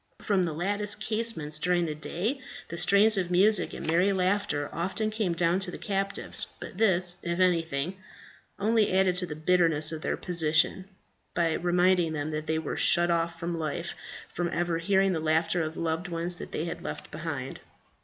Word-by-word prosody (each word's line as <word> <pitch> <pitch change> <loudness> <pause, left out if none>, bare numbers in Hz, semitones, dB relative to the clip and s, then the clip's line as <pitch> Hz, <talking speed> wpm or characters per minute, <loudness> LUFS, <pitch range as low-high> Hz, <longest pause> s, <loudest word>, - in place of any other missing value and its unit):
From 200 -3 0
the 170 -3 -1
lattice 205 +5 -1
casements 215 -9 -1
during 175 +2 +1
the 155 - -3
day 175 - -3 0.3
the 170 - -6
strains 200 +3 +4
of 180 -2 -2
music 200 +4 +3
and - - -7
merry 175 +5 +2
laughter 185 -6 0
often 195 +6 -2
came 215 -5 -1
down 170 +2 +1
to 190 - 0
the - - -7
captives; 195 -1 -2
but 190 - -9
this, 180 -4 +6
if 170 +1 -3
anything, 170 -2 0 0.6
only 220 +1 +2
added 190 -1 +3
to 180 0 -1
the 150 - -6
bitterness 160 -2 +2
of 160 -1 -6
their - - -2
position, 170 +1 +1 0.5
by 165 -2 +1
reminding 175 -1 +2
them 150 0 -3
that 155 0 -4
they 160 - 0
were 160 -2 -4
shut 175 -1 +4
off 170 0 -1
for - - -5
life 170 0 -3 0.3
from 175 -1 -3
ever 170 0 -1
hearing 195 +2 +2
the 165 - -1
laughter 160 +2 +1
of 160 0 -4
the - - -5
loved 165 +2 -2
ones 170 0 0
they 160 - -5
had 165 - -6
left - - -7
behind. 150 -4 -5
175 Hz, 185 wpm, -27 LUFS, 160-190 Hz, 0.6 s, this